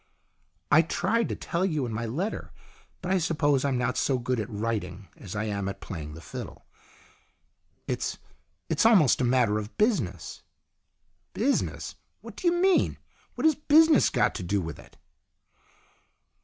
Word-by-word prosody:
" - - -44 0.3
I 155 - +7
tried 190 +7 0
to - - -2
tell 170 +1 -2
you 155 -8 0
in 115 - -5
my 115 +1 -3
letter. 175 - -3 0.5
But 180 - -2
I 190 - +3
suppose 145 -5 +1
I'm 135 -3 +1
not 125 +1 0
so 135 - +1
good 125 0 -1
at 110 +1 -4
writing 100 -4 -4
as 100 -1 -9
I 105 - -1
am 100 -2 -2
at 100 - -7
playing 75 -4 -7
the 80 - -10
fiddle. 75 - -8 1.2
It's - - -2 0.5
it's - - +1
almost 190 - +5
a - - +2
matter 120 -4 +2
of 105 +1 -9
business." 205 - -1 0.9
"Business? 265 +7 -1 0.3
What - - -11
do 365 - -2
you 345 - +4
mean? 365 +1 +2 0.4
What 250 - -2
has 315 - +6
business 305 +1 +5
got - - +1
to - - -5
do 100 +3 0
with 80 -5 -6
it - - -17
130 Hz, 165 wpm, -27 LUFS, -, 1.2 s, I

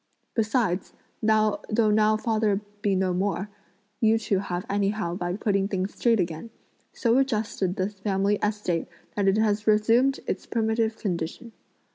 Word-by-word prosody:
Besides, 215 -5 0 0.3
though 215 -1 +3 0.2
now 215 -1 +4
father 215 -3 +1 0.2
be 205 -2 +1
no 185 -1 +1
more, 195 +2 -1 0.5
you 220 0 +4
two 210 -3 0
have 180 -2 -4
anyhow 200 -3 0
by 175 -1 -2
putting 195 -2 +1
things 190 -1 -2
straight 230 -3 +2
again, 170 +4 -3 0.4
so 235 +1 +2
adjusted 215 -7 0
the 190 -2 0
family 200 0 0
estate 210 -5 -1 0.3
that 200 -1 +1
it 195 +2 +4
has 210 -1 +1
resumed 230 +6 +4
its - - -4
primitive 220 0 0
condition. 175 +4 -4
210 Hz, 140 wpm, -26 LUFS, 190-220 Hz, 0.5 s, now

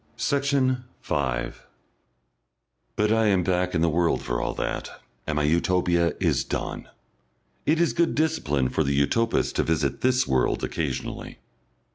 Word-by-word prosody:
Section 140 -3 +1 0.2
5 65 -3 -2 1.3
But 105 0 +1
I 110 0 +3
am 95 -3 +3
back 90 0 0
in 80 - +1
the 85 - +3
world 85 +1 +1
for - - -2
all - - -2
that, - - -3 0.4
and 80 - -1
my 75 - +1
Utopia 85 +1 +2
is - - +1
done. - - -4 0.8
It 155 +2 +3
is 170 - +2
good 170 -1 +1
discipline 75 - +1
for 80 - 0
the 70 -1 0
Utopist 115 +11 +1
to - - +3
visit 75 -4 -1
this 130 0 +3
world 65 -2 +1
occasionally. - - -4
90 Hz, 145 wpm, -25 LUFS, -, 1.3 s, I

